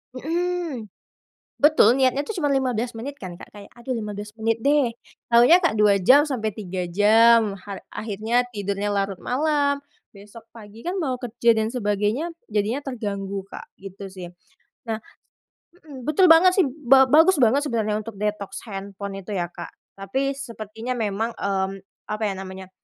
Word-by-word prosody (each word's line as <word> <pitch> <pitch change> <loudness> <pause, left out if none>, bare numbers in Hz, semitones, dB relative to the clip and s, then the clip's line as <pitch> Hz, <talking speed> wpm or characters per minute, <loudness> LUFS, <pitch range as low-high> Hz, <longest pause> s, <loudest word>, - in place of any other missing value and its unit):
Hmm. 330 -4 -3 0.8
Betul 295 -6 +6
niatnya 270 +2 +1
tuh 440 - -4
cuma 295 -6 0
15 250 -3 0
menit 275 +5 -6
kan, 175 -1 -7
Kak, - - -14
kayak 205 -1 -12
aduh 255 +2 -4
15 210 -1 -6
menit 225 0 -1
deh, 280 -1 +2 0.4
taunya 245 +11 +6
Kak, 255 -11 +1
2 210 -1 +5
jam 285 - +6
sampai 225 -6 -2
3 185 -3 -5
jam, 220 +2 +5
ha 200 0 -8 0.2
akhirnya 220 +3 0
tidurnya 205 -1 -3
larut 195 -2 -2
malam, 285 +1 +1 0.3
besok 205 +3 -14
pagi 220 0 -13
kan 365 +3 -3
mau 270 -7 -1
kerja 235 -1 +2
dan 220 0 0
sebagainya, 220 +8 -1 0.2
jadinya 215 +7 -1
terganggu, 200 -6 -4
Kak, - - -11
gitu 195 0 -9
sih. 185 -2 -8 0.6
Nah 220 - -1 0.8
mhm, 290 -8 -12
betul 325 +3 +4
banget 365 +3 +7
sih, 385 - +4 0.2
ba 265 0 +6
bagus 320 0 +5
banget 275 +6 +3
sebenarnya 215 -4 -1
untuk 215 0 -7
detox 210 -1 -4
handphone 200 -1 -7
itu 200 +2 -7
ya, 175 -2 -2
Kak, - - -9 0.2
tapi 265 +8 -1
sepertinya 230 -1 -6
memang, 225 0 -2
mmm, 195 0 -2 0.3
apa 215 - -6
ya 200 -2 0
namanya, 190 0 -8
225 Hz, 160 wpm, -23 LUFS, 200-270 Hz, 0.8 s, banget